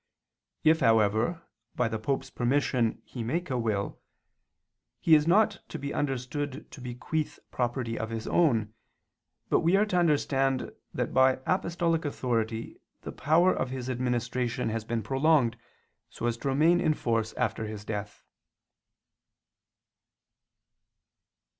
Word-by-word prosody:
If, 160 +1 +5
however, 115 - +2 0.3
by - - +1
the 110 -1 -3
Pope's 135 +5 -2
permission 125 -2 0
he 125 - -7
make 155 +8 -2
a 130 - 0
will, 105 -4 -2 1.0
he 165 - +3
is 150 0 +6
not 205 +3 +4
to - - -5
be 140 -1 -4
understood 140 +1 -3
to 135 - -11
bequeath 125 +5 -3
property 120 -1 -2
of 110 - -3
his 115 -1 -4
own, 115 -11 +2 0.8
but - - +4
we 170 +4 +3
are 205 +2 +4
to 185 -4 -1
understand 135 -5 +1 0.2
that - - -3
by 130 0 +4
apostolic 170 -2 0
authority 115 -5 -2 0.2
the - - -6
power 165 +6 +3
of 130 - -2
his 130 0 -4
administration 125 0 -1
has 110 0 -2
been 115 0 -2
prolonged 135 0 +3 0.5
so - - -6
as 120 -1 +1
to 140 - -5
remain 160 +6 +4
in 155 - +2
force 115 -4 -1
after 110 -2 -1
his 105 -1 -7
death. 105 -1 -5
130 Hz, 135 wpm, -28 LUFS, 115-155 Hz, 1.0 s, is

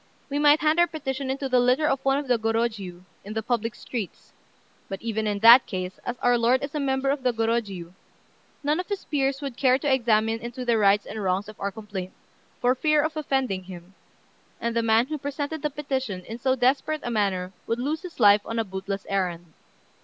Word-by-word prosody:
We 285 - 0
might 295 +1 +5
hand 310 +2 +3
our 345 - +5
petition 275 -4 -4
into 270 +1 -2
the 255 -1 +3
litter 250 +5 +3
of 270 -2 0
one 270 0 +3
of 285 -1 -3
the 245 -2 +2
Gorôjiu, 220 -5 -2 0.2
in 210 - -7
the 220 - -2
public 230 0 -1
streets; 225 -7 -7 0.6
but, 195 - -5
even 220 -1 -2
in 205 -1 0
that 235 +3 +9
case, 185 -1 -5
as 245 - -4
our 245 -1 +4
lord 245 +3 +3
is 280 - -5
a 300 - -2
member 270 -1 0
of 280 -1 -2
the 255 -1 +2
Gorôjiu, 225 -7 -2 0.7
none 300 +3 +1
of 365 - -4
his 405 -2 -4
peers 275 -1 -1
would 275 -4 -4
care 260 -2 +4
to 275 0 +1
examine 225 -3 +2
into 240 +2 -6
the 235 -2 +2
rights 200 0 +4
and 220 - -6
wrongs 190 +1 0
of 215 - -12
our 200 - -2
complaint, 195 -3 -7 0.5
for 250 0 +3
fear 305 +3 +2
of 310 0 -2
offending 265 -11 -1
him, 180 0 -11 0.7
and 235 0 -2
the 230 - +2
man 225 +1 +3
who 305 +2 -5
presented 285 +2 -4
the 300 - 0
petition 265 -10 -4
in 225 +2 -7
so 260 +1 +2
desperate 270 +4 +1
a 240 - -3
manner 195 -4 -1
would 230 - 0
lose 290 +6 -2
his 360 -6 -10
life 205 -2 +6
on 230 - -5
a 225 - +2
bootless 195 0 -5
errand. 175 -4 -2
240 Hz, 215 wpm, -25 LUFS, 210-275 Hz, 0.7 s, that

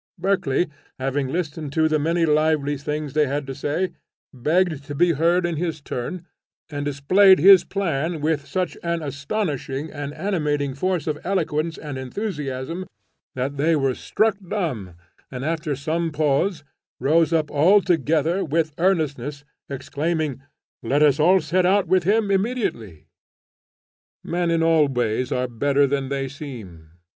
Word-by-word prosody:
Berkeley, 180 -4 +1 0.3
having 135 +1 -1
listened 155 -1 -3
to 160 0 +3
the 155 -1 +1
many 165 +3 +1
lively 150 -1 +2
things 150 0 -4
they 150 -1 +3
had 145 +1 -2
to 135 - -5
say, 145 +7 -2 0.4
begged 155 +3 +1
to 145 0 -6
be 175 +4 +4
heard 170 +3 +2
in 170 -2 -2
his 165 -1 -2
turn, 145 +6 -5 0.5
and 145 -1 -3
displayed 185 +8 +5
his 190 +3 +8
plan 165 -4 -2
with 150 -1 -1
such 185 -2 -2
an 170 -1 -2
astonishing 145 - -3
and 145 0 -5
animating 150 -6 -1
force 180 +4 -1
of 150 -2 -2
eloquence 165 -4 -1
and 145 -4 -6
enthusiasm, 150 - -4 0.5
that 135 +2 -3
they 160 +4 +3
were 135 -3 +1
struck 220 - 0
dumb, 130 - -3 0.3
and, 130 +1 -5
after 155 -2 -1
some 160 +5 -1
pause, 150 +3 0 0.4
rose 160 +3 +3
up 160 -2 +1
all 175 +8 +5
together 165 0 +1
with 155 0 0
earnestness, 150 -6 0 0.3
exclaiming, 145 +1 -2 0.4
'Let 140 +6 +2
us 155 +6 +4
set 185 +2 +2
out 200 +1 +3
with 180 0 +2
him 205 +1 +2
immediately.'" 190 - -2 1.2
Men 175 0 -1
in 165 -1 +2
all 165 -2 +4
ways 125 0 -1
are 125 -1 0
better 140 +4 +2
than 135 -1 -1
they 135 -1 -2
seem. 115 - -9
155 Hz, 145 wpm, -23 LUFS, 140-175 Hz, 1.2 s, his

